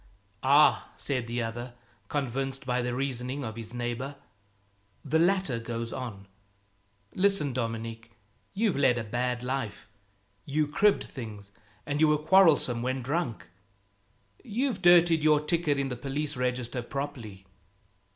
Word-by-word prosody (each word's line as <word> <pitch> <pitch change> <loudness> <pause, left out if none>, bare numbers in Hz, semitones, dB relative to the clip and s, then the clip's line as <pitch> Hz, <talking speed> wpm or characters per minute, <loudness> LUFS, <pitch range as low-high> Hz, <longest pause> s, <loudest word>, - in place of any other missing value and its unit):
"Ah!" 140 +3 +5
said 125 -5 -2
the 120 0 -2
other, 120 +2 -6 0.3
convinced 135 0 -2
by 125 0 0
the 125 0 -2
reasoning 130 +1 -3
of 110 -2 -5
his 115 -1 -7
neighbor. 120 +3 -4 0.9
The 155 +3 +2
latter 175 -8 +2
goes 115 0 -4
on 105 -6 -6 0.9
"Listen, 190 -8 +2
Dominique. 115 -1 -4 0.5
You've 210 -1 +1
led 135 -3 +4
a 120 - -2
bad 120 +2 -2
life. 125 -6 -3 0.6
You 150 +2 0
cribbed 195 +8 +3
things, 105 -6 -9 0.3
and 145 +1 -2
you 155 - +6
were 150 0 +4
quarrelsome 155 -7 +4
when 130 +1 -2
drunk. 135 - -2 1.0
You've 240 +1 -1
dirtied 175 -2 +6
your 155 -1 +5
ticket 150 -1 0
in 140 -1 -1
the 125 - -3
police 145 +3 -3
register, 125 0 -2
properly." 120 -7 -6
130 Hz, 130 wpm, -28 LUFS, 120-150 Hz, 1.0 s, you